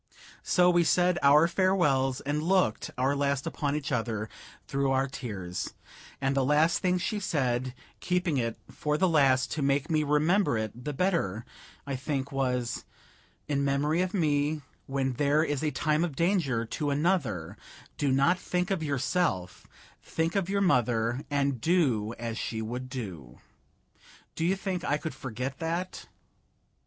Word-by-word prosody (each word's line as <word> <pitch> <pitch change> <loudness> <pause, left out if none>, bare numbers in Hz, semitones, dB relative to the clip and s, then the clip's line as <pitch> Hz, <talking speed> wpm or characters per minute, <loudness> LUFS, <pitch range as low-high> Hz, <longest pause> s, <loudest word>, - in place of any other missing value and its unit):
So 180 -1 +3
we 175 -1 +4
said 180 +1 +3
our 150 +4 +6
farewells, 170 -8 +2
and 145 +2 -1
looked 180 - +1
our 135 +3 +2
last 140 -1 0
upon 145 -1 -2
each 150 -2 -3
other 115 -3 -2 0.4
through 140 0 0
our 135 0 +2
tears; 95 -9 -5 0.4
and 135 0 0
the 135 - +2
last 150 +5 +3
thing 180 -1 +1
she 205 +4 -2
said 130 - -1 0.2
keeping 180 -4 0
it 115 -2 -1
for 150 0 -1
the 185 - +3
last 135 -6 +3
to 155 - -2
make 140 +2 +1
me 155 -1 +3
remember 150 - +2
it 110 +3 -5
the 150 - -1
better, 140 - 0 0.4
I 140 -1 -3
think 140 +1 -3
was, 125 -3 -1 0.6
"In 140 -1 0
memory 145 +4 +1
of 185 0 -1
me, 150 -4 +1 0.2
when 135 -1 -1
there 145 +4 +2
is 145 -2 -2
a 155 - +2
time 150 +3 +1
of 165 -6 -2
danger 165 - +1
to 145 +6 -3
another 140 - 0 0.4
do 140 -2 +2
not 140 +7 +3
think 180 +2 -1
of 190 -4 0
yourself, 135 - -1 0.3
think 165 +2 -2
of 195 -2 0
your 200 0 +1
mother, 120 - +2
and 140 -4 0
do 125 - +1
as 115 -1 -4
she 110 - -3
would 125 +4 -4
do." 90 - -7 0.9
Do 160 - -3
you 185 +3 +2
think 190 -2 -3
I 145 -4 +1
could 155 -1 -5
forget 130 +1 -5
that? 170 +3 -3
140 Hz, 160 wpm, -28 LUFS, 125-170 Hz, 0.9 s, our